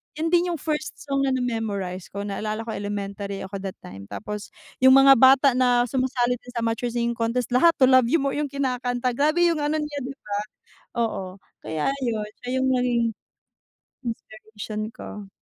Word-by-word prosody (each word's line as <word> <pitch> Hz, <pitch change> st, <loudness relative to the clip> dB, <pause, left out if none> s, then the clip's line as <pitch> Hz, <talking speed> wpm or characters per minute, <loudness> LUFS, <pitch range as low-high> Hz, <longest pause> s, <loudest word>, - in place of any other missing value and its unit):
yun 320 Hz, +2 st, -1 dB
din 350 Hz, 0 st, +4 dB
yung 330 Hz, -, -4 dB
first 305 Hz, -1 st, -2 dB
song 275 Hz, -1 st, -1 dB
na -, -, +1 dB
na-memorize 210 Hz, -7 st, -2 dB
ko 200 Hz, 0 st, -5 dB
naalala 215 Hz, +2 st, -3 dB
ko 225 Hz, -, -5 dB
elementary 200 Hz, -1 st, -4 dB
ako 195 Hz, +1 st, -6 dB
that 190 Hz, -1 st, -5 dB
time. 95 Hz, +2 st, -10 dB
Tapos 210 Hz, -, -7 dB, 0.2 s
yung 260 Hz, +1 st, +7 dB
mga 270 Hz, 0 st, +8 dB
bata 265 Hz, +1 st, +7 dB
na 245 Hz, -1 st, +3 dB
sumasali 250 Hz, -1 st, 0 dB
din 245 Hz, -, -13 dB
sa 235 Hz, -, -1 dB
amateur 230 Hz, +1 st, -1 dB
singing 235 Hz, 0 st, -1 dB
contest 235 Hz, +1 st, -1 dB
lahat 330 Hz, +7 st, +5 dB
To 265 Hz, -, +2 dB
Love 255 Hz, -2 st, +6 dB
You 285 Hz, +3 st, +2 dB
More, 275 Hz, -, 0 dB
yung 295 Hz, -, 0 dB
kinakanta 250 Hz, -2 st, -1 dB
grabe 305 Hz, +7 st, +2 dB
yung 320 Hz, -, -1 dB
ano 295 Hz, +1 st, 0 dB
niya 295 Hz, -1 st, -5 dB
di 270 Hz, +1 st, -6 dB
ba? 210 Hz, -6 st, -9 dB, 0.7 s
Oo, 190 Hz, -4 st, -3 dB, 0.2 s
kaya 155 Hz, -, -1 dB, 0.2 s
yun 215 Hz, -3 st, -2 dB, 0.2 s
siya -, -, -4 dB
yung 260 Hz, -, +2 dB
naging 245 Hz, -2 st, +2 dB, 1.0 s
inspiration 215 Hz, -1 st, -6 dB
ko. 210 Hz, -5 st, -9 dB
240 Hz, 180 wpm, -24 LUFS, 210-270 Hz, 1.0 s, mga